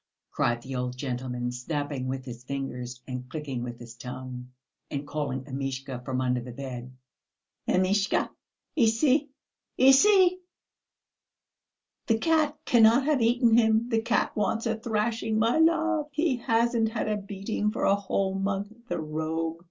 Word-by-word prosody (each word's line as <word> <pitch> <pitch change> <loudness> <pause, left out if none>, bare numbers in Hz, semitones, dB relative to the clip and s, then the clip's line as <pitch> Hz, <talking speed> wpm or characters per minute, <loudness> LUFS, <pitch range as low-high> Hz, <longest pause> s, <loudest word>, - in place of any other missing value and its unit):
cried 120 0 +1
the 135 - -7
old 125 0 -3
gentleman, 125 -2 -3
snapping 140 +1 -3
with 130 0 -4
his 120 -1 -8
fingers 125 -2 -5
and 125 -1 -6
clicking 140 -4 -4
with 120 -1 -5
his 120 -1 -11
tongue, 125 0 -8 0.4
and 145 0 -4
calling 145 -3 -2
Amishka 135 -1 -5
from 130 0 -2
under 125 -1 0
the 125 +1 -8
bed. 125 -1 -7 0.8
"Amishka, 195 +2 +2 0.4
ici, 265 +4 +3 0.5
ici. 365 +8 +6 1.7
The 225 - +3
cat 310 +2 +2
cannot 235 +2 +5
have 295 -4 +2
eaten 235 0 +4
him. 225 0 +3
The 225 -2 +2
cat 230 - 0
wants 215 +2 0
a 225 -1 +1
thrashing, 220 0 -1
my 230 +7 +3
love, 320 -1 +3
he 300 -3 +1
hasn't 230 -1 +2
had 220 -1 -2
a 215 - +1
beating 200 +1 -2
for - - -3
a - - +5
whole 195 -1 0
month, 195 +2 -2
the - - -2
rogue. 160 +1 -3
195 Hz, 145 wpm, -27 LUFS, -, 1.7 s, ici